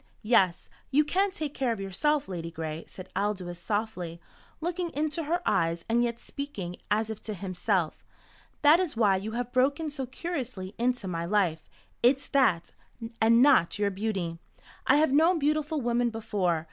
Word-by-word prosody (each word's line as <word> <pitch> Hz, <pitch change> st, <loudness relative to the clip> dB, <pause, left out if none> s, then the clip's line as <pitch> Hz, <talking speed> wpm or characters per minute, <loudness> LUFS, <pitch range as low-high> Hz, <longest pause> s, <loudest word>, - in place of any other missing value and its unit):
"Yes, 195 Hz, -6 st, +3 dB, 0.2 s
you 290 Hz, +2 st, +4 dB
can 385 Hz, +7 st, +1 dB
take 310 Hz, -7 st, -4 dB
care 260 Hz, -5 st, 0 dB
of 225 Hz, -, -3 dB
yourself, 275 Hz, +10 st, 0 dB
Ladygray," 165 Hz, -3 st, -5 dB
said 185 Hz, -, -10 dB
Aldous 185 Hz, -3 st, -2 dB
softly, 185 Hz, -4 st, -3 dB, 0.4 s
looking 345 Hz, +1 st, -2 dB
into 305 Hz, +2 st, -1 dB
her 345 Hz, +4 st, -1 dB
eyes 165 Hz, 0 st, +1 dB
and 235 Hz, +1 st, +2 dB
yet 235 Hz, -1 st, -2 dB
speaking 200 Hz, -11 st, -6 dB
as 215 Hz, +1 st, +1 dB
if 220 Hz, -, -7 dB
to 215 Hz, -, -5 dB
himself. 185 Hz, -2 st, -1 dB, 0.6 s
"That 300 Hz, +3 st, +7 dB
is 345 Hz, -10 st, -2 dB
why 205 Hz, -4 st, +4 dB
you 210 Hz, +3 st, -5 dB
have 245 Hz, +1 st, -3 dB
broken 280 Hz, +5 st, +1 dB
so 270 Hz, -3 st, -4 dB
curiously 255 Hz, -, -5 dB
into 245 Hz, -3 st, 0 dB
my 170 Hz, -2 st, -2 dB
life. 175 Hz, -4 st, 0 dB, 0.3 s
It's 270 Hz, +3 st, +3 dB
that 185 Hz, -, +2 dB, 0.5 s
and 230 Hz, +2 st, +6 dB
not 265 Hz, -11 st, +4 dB
your 205 Hz, -1 st, +1 dB
beauty. 190 Hz, -5 st, -3 dB, 0.5 s
I -, -, +6 dB
have 305 Hz, -1 st, +4 dB
known 330 Hz, +5 st, +5 dB
beautiful 305 Hz, 0 st, 0 dB
women 240 Hz, 0 st, +1 dB
before. 205 Hz, -7 st, -1 dB
225 Hz, 160 wpm, -28 LUFS, 185-285 Hz, 0.6 s, That